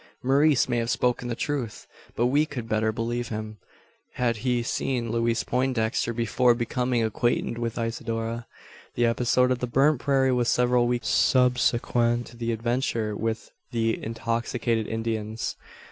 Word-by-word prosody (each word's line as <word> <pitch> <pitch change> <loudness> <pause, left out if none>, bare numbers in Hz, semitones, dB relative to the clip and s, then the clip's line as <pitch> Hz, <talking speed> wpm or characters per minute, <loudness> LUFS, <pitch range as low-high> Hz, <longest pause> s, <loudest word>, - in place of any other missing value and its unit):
Maurice 140 +2 +4
may 120 - 0
have 115 0 -2
spoken 125 0 0
the 120 - -2
truth; 130 -5 -3 0.3
but 120 - +1
we 145 +5 +3
could 125 -6 -6
better 110 0 +1
believe 120 +2 -2
him, 110 -1 -6 0.6
had 120 -2 0
he 120 +1 0
seen 120 -1 -1
Louise 115 0 +1
Poindexter 125 -3 0
before 120 +1 +2
becoming 120 0 0
acquainted 115 +1 0
with 115 -1 -3
Isidora. 115 0 -3 0.5
The 120 - +2
episode 125 +2 +2
of 125 - 0
the 125 - -2
burnt 135 +3 +3
prairie 135 -2 +2
was 125 -1 +1
several 125 -1 +3
weeks 120 -2 -1
subsequent 120 -2 +2
to 120 - -13
the 115 0 -2
adventure 115 -2 -1
with 115 +1 -3 0.2
the 115 -1 -1
intoxicated 115 0 -1
Indians. 110 -1 -3
120 Hz, 145 wpm, -26 LUFS, 115-125 Hz, 0.6 s, Maurice